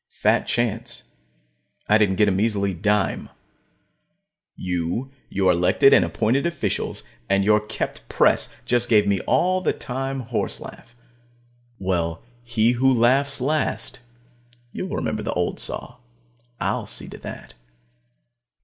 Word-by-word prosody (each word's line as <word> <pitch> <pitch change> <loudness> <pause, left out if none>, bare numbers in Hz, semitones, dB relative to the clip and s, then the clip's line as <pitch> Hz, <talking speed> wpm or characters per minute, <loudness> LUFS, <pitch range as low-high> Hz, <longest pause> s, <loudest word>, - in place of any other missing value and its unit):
Fat - - +1
chance 115 -2 -2 0.8
I 105 +1 +5
didn't 100 -3 +3
get 105 +2 +3
a - - +3
measly 100 0 0
dime. 105 +2 0 1.3
You, 90 +8 -3 0.2
your 95 -1 +2
elected 90 +10 +4
and - - +6
appointed 115 - +1
officials, 170 -4 -3 0.3
and 100 0 +3
your 105 +1 +4
kept 105 +1 -5
press - - +3
just 120 0 +1
gave 105 -2 +5
me 100 -1 +1
the - - -9
all 185 +1 +2
time 135 0 -4
horse 120 -1 -3
laugh. 120 - -12 0.8
Well, 85 -3 -2 0.2
he 120 -1 +2
who 130 +2 +3
laughs 130 +4 +3
last 150 +3 -1 0.7
you'll 185 - -4
remember 110 - -2
the - - -3
old 90 0 -1
saw; 125 - -1 0.6
I'll - - -1
see - - -4
to - - -10
that. - - -9
110 Hz, 130 wpm, -23 LUFS, 95-130 Hz, 1.3 s, and